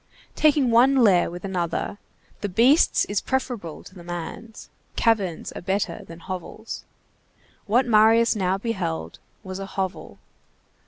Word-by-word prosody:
Taking 290 -5 +3
one 250 +4 +5
lair 205 -9 +4
with 175 +2 -8
another, 185 +1 -3 0.4
the 205 - -3
beast's 245 - +4
is 205 -1 -1
preferable 245 - -3
to - - -14
the 180 -3 -12
man's. 175 +6 -7 0.3
Caverns 200 -8 0
are - - -8
better 190 -2 -2
than 165 0 -11
hovels. 185 +5 -7 0.8
What 240 +5 +3
Marius 225 0 +5
now 190 -2 0
beheld 80 - -4 0.2
was 185 0 -6
a 195 - -5
hovel. 190 -1 -4
200 Hz, 130 wpm, -24 LUFS, 180-230 Hz, 0.8 s, one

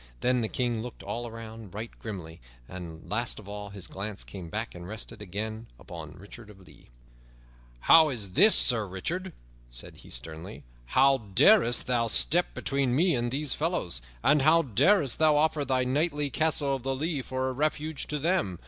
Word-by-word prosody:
Then 125 0 +2
the 110 - -2
King 120 -3 -1
looked 120 0 -8
all 115 +4 -4
around 110 -3 -10
right 110 +2 -5
grimly, 85 - -8 0.3
and, 85 -3 -9
last 120 +3 -1
of 105 - -11
all, 105 0 -7
his 100 -2 -7
glance 100 +1 -4
came 90 -4 -9
back 110 +4 -3
and 85 0 -9
rested 110 +1 -6
again 110 +3 -5
upon 80 +3 -9
Sir - - -16
Richard 105 +4 -12
of 95 -3 -16
the - - -16
Lea. - - -21 0.9
"How 160 -1 +7
is 105 -8 -5
this, 195 - +7
Sir 115 -5 +3
Richard?" 170 - -4 0.4
said - - -7
he - - -15
sternly. 80 +5 -6 0.3
"How 135 +1 +5
darest 120 - +4
thou 120 -2 +1
step 170 +9 +3
between 135 -3 0
me 170 +4 +3
and 120 -2 0
these 145 +3 -1
fellows? 155 - -2 0.2
And 150 -1 +4
how 160 +4 +5
darest 140 - +2
thou 155 -2 +5
offer 155 -1 +2
thy 130 -1 +1
knightly 145 +2 0
Castle 145 -2 +1
of - - -14
the 135 +1 -2
Lea 150 +1 -2
for 130 0 -3
a 130 - -2
refuge 150 +2 -2
to 150 - -2
them? 150 - 0
120 Hz, 185 wpm, -28 LUFS, 100-150 Hz, 0.9 s, How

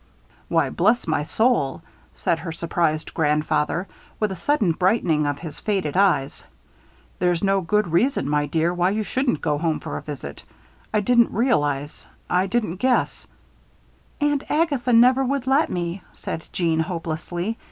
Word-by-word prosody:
"Why, - - +2
bless 240 +2 +2
my 155 -2 0
soul!" 220 - +1 0.3
said 165 - 0
her 165 +1 -5
surprised 160 -1 -1
grandfather; 150 +3 0 0.3
with 215 -2 0
a - - -3
sudden 215 - +1
brightening 170 -4 +1
of 145 -1 -1
his 155 0 -8
faded 190 -8 -1
eyes. 180 -8 +2 0.8
"There's 175 -1 +1
no 195 0 +2
good 210 +3 +1
reason, 175 - +1
my 145 0 +1
dear, 165 +2 +1
why 180 +1 +2
you 215 +2 -1
shouldn't 250 - -1
go 150 -2 0
home 160 -1 0
for - - -5
a - - -6
visit. 135 - -8 0.5
I 215 - +2
didn't 235 +2 +4
realize, 145 - -1 0.2
I 180 +2 +2
didn't 200 -4 -1
guess 255 +4 0 0.4
" - - -35
"Aunt 290 -1 +1
Agatha 290 -6 +1
never 250 +3 +5
would 270 0 -1
let 275 +4 +3
me," 175 +1 -3
said 165 - -6
Jeanne, 165 -3 0
hopelessly. 175 +4 -3
180 Hz, 155 wpm, -23 LUFS, 160-230 Hz, 0.8 s, never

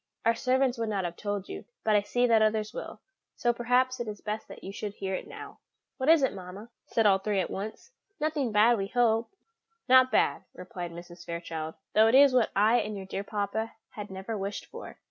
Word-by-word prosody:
Our 230 - +5
servants 255 0 +1
would 225 -1 -1
not 200 -3 -1
have 175 0 -4
told 205 -1 -4
you, - - -7 0.2
but 215 -1 +3
I 205 - +5
see 245 +4 +1
that 225 -2 +4
others 215 0 +1
will, - - -7 0.3
so 240 -1 +1
perhaps 250 +2 +1
it 240 - -3
is 210 -1 -6
best 215 +1 -5
that - - -12
you 195 - -6
should 205 0 -6
hear 190 -1 -4
it - - -4
now." - - -10 0.4
"What 260 +2 0
is 325 -3 +6
it, 265 - +2
mamma?" 190 +4 -9 0.2
said 225 - +1
all 195 -2 +5
three 200 0 -1
at 185 - -2
once; 215 - -6 0.3
"nothing 295 -5 -1
bad, 215 +2 +4
we 195 - -2
hope." 230 0 +2 0.6
"Not 255 0 +6
bad," - - +2
replied 180 -1 -7
Mrs. 175 0 -11
Fairchild, 165 -2 -5 0.2
"though 220 +1 +6
it 225 - +4
is 275 -1 +7
what 245 -4 +3
I 215 +4 +4
and 210 -2 -2
your 190 - -7
dear 195 +1 -4
papa 210 +2 -3 0.2
had 210 -1 -8
never 190 +4 -5
wished 200 0 -4
for." - - -10
215 Hz, 220 wpm, -28 LUFS, 195-240 Hz, 0.6 s, is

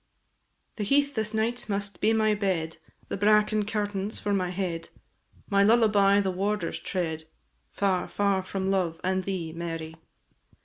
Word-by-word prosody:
The 210 - -2
heath 280 +6 +2
this 220 -3 -2
night 225 +2 -1
must 200 0 -3
be 215 - +4
my 220 -1 +3
bed, 185 -6 -1 0.3
The - - -2
bracken 210 +1 +3
curtains 205 -1 -2
for 205 - -1
my 185 -2 0
head, 175 -3 -3 0.6
My 200 -1 +3
lullaby 205 -2 +5
the 190 -1 0
warder's 205 +3 -2
tread, 160 -4 -3 0.4
Far, 195 -2 0
far 200 -2 +1
from 190 0 -2
love 175 -4 0
and 185 0 0
thee, 175 -5 -3
Mary. 165 -1 -5
200 Hz, 145 wpm, -27 LUFS, 185-210 Hz, 0.6 s, lullaby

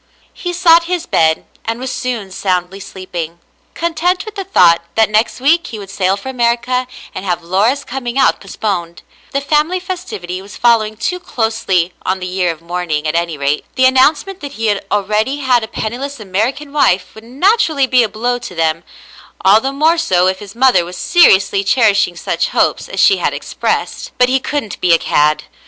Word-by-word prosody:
He 355 - -5
sought 340 -1 +4
his 350 -1 -2
bed, 160 -1 +1 0.2
and 230 +1 -3
was 260 0 -4
soon 230 -6 -4
soundly 185 0 -2
sleeping, 175 -4 -7 0.4
content 340 +3 -1
with 430 - -8
the 395 -2 -5
thought 175 - +4
that 220 -1 +3
next 215 +4 +1
week 325 +6 +2
he 225 - -7
would 200 -2 -9
sail 190 0 0
for 205 - -10
America 250 0 0 0.3
and 185 - -6
have 175 -3 -2
Laura's 210 +11 +1
coming 250 -1 -5
out 265 - +3
postponed. 185 -4 -4 0.3
The 275 - -2
family 305 +6 +1
festivity 350 - -6
was 200 +1 -12
following 220 -3 +2
too 360 - -2
closely 220 - -1
on 190 +1 -1
the 185 - -6
year 180 -1 -1
of 165 0 -11
mourning, 170 -3 -3
at 155 - -1
any 170 -2 -1
rate. 140 +1 -1
The 260 - +3
announcement 295 +9 +3
that 285 -1 -7
he 220 -4 0 0.2
already 210 +6 0
had 250 -3 +2
a - - -4
penniless 245 +5 -5
American 225 +9 -2
wife 185 -11 +2
would 220 - -13
naturally 300 - +2
be 255 -1 +3
a 225 - +1
blow 240 +4 -2
to 210 -7 -9
them, 165 0 0 0.6
all 200 +4 +5
the 270 - -2
more 315 +4 +2
so 180 - +2
if 185 0 0
his 205 0 -11
mother 245 -8 +4
was 175 +1 -8
seriously 200 - +4
cherishing 210 -4 +2
such - - -1
hopes - - 0
as - - -5
she 390 - +5
had - - -1
expressed; - - -3
but 250 0 +4
he 265 +1 +2
couldn't 265 -5 -4
be 175 -2 +4
a - - +6
cad. 150 -1 +1
220 Hz, 190 wpm, -15 LUFS, 185-275 Hz, 0.6 s, a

